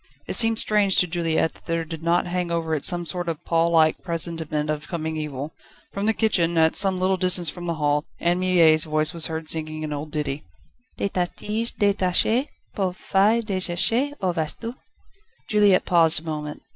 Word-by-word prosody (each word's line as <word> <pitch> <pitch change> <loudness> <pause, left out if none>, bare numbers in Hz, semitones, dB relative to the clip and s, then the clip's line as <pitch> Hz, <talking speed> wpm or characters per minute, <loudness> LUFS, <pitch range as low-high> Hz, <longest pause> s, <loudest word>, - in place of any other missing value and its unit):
It - - -3
seemed 225 -1 +4
strange 205 -3 +1
to - - +5
Juliette 165 -1 -1
that - - -22
there 165 -1 -2
did 160 0 -8
not 170 +2 +1
hang 180 0 -3
over 165 -1 -2
it 150 - -2
some 175 -1 +2
sort 175 +2 -3
of 160 -2 -6
pall 165 0 +1
like 160 -2 +3
presentiment 165 -3 -3
of 150 0 -5
coming 160 -2 -4
evil. 150 -1 -5 0.4
From 200 +2 -2
the 220 - +3
kitchen, 170 -7 +1
at 160 0 +3
some 190 -2 +4
little 190 +1 +1
distance 180 -2 +3
from 175 -1 -8
the 170 - -2
hall, 150 -1 0
Anne 175 +1 0
Mie's 170 -4 +4
voice 155 +1 +3
was 165 -2 +2
heard 160 -1 -5
singing 155 -1 -2
an 150 -1 -4
old 145 +1 -6
ditty: 150 -2 -4 0.3
/* 250 +1 -42
"De - - -1
ta 180 -2 -1
tige 220 +6 -4
détachée 205 +6 +1 0.3
Pauvre 185 -2 -2
feuille 210 +4 +2
désséchée 215 +8 +1
Où 185 -3 -1
vas 160 -3 -2
tu?" 230 +1 -6 0.4
*/ 440 +4 -37
Juliette 205 -3 +3
paused 165 -2 +3
a - - -16
moment. 150 -2 -6
170 Hz, 200 wpm, -23 LUFS, 160-190 Hz, 0.4 s, to